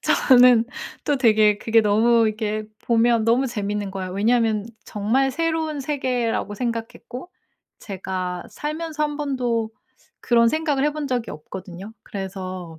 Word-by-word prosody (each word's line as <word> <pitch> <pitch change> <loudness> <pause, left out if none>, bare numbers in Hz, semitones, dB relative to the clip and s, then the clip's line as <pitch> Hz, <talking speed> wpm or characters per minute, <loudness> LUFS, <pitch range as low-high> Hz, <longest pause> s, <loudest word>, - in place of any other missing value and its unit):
저는 250 -3 +5 0.4
또 290 - +1
되게 215 -5 +4
그게 225 0 +3
너무 225 +2 +3
이렇게 215 0 -2 0.2
보면 235 -1 +3
너무 245 +4 +3
재밌는 205 -3 -3
거예요. 190 -1 -5
왜냐면 220 0 +1 0.2
정말 240 +7 0
새로운 320 0 -1
세계라고 250 -7 -2
생각했고 240 - -5 0.5
제가 185 -2 -5
살면서 305 0 -4
1 295 -1 -1
번도 245 -6 -1 0.5
그런 235 -1 +3
생각을 295 -1 0
해 300 - +1
본 300 -2 -4
적이 245 -3 -2
없거든요. 185 +6 -9
그래서 185 -4 -7
230 Hz, 285 characters per minute, -22 LUFS, 205-265 Hz, 0.5 s, 저는